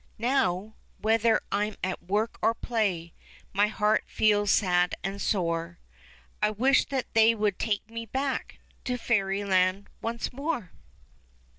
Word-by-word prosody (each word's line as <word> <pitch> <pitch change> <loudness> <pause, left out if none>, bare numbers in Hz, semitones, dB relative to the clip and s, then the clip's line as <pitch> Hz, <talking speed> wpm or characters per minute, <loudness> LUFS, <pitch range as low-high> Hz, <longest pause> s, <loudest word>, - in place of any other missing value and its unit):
Now, 220 -5 0 0.3
whether 225 0 +3
I'm 210 +1 0
at 185 0 -2
work 205 +6 -1
or 230 - +3
play 195 -10 -1 0.4
My 205 +2 +3
heart 215 0 +1
feels 205 -1 +2
sad 180 -3 +3
and 195 +1 -4
sore: 170 -3 -1 0.6
I 210 - +3
wish 255 +6 +3
that 265 -2 -4
they 225 +1 +5
would 210 -3 0
take 215 -2 -1
me 230 0 -7
back 265 +3 -3 0.3
To 250 -1 -1
fairyland 195 -3 +1
once 230 +2 -3
more. 275 - -3
210 Hz, 130 wpm, -27 LUFS, 195-230 Hz, 0.6 s, they